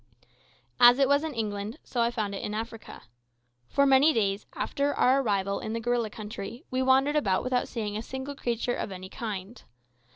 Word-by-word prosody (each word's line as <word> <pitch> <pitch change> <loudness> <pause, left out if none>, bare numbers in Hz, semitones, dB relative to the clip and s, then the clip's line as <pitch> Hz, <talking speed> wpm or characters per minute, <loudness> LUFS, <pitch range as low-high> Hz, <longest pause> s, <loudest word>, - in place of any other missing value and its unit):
As 245 0 +8
it 275 -1 +4
was 285 +2 +3
in 315 -4 -4
England, 210 0 -3
so 240 - -2
I 235 - +3
found 215 -4 -3
it 195 - -4
in 210 - -3
Africa. 225 0 -7 0.6
For 280 0 +2
many 275 +3 +5
days 200 -4 0
after 285 +1 -1
our 265 +2 +4
arrival 200 -4 0
in 220 - -5
the 230 - -2
gorilla 235 -1 0
country, 215 +2 -7
we 255 0 0
wandered 265 +3 +3
about 195 -11 +1
without 250 -1 0
seeing 210 -3 -4
a 215 - -2
single 265 +4 -6
creature 240 -2 -2
of - - -4
any 185 0 -8
kind. 210 0 -6
235 Hz, 190 wpm, -28 LUFS, 210-265 Hz, 0.6 s, As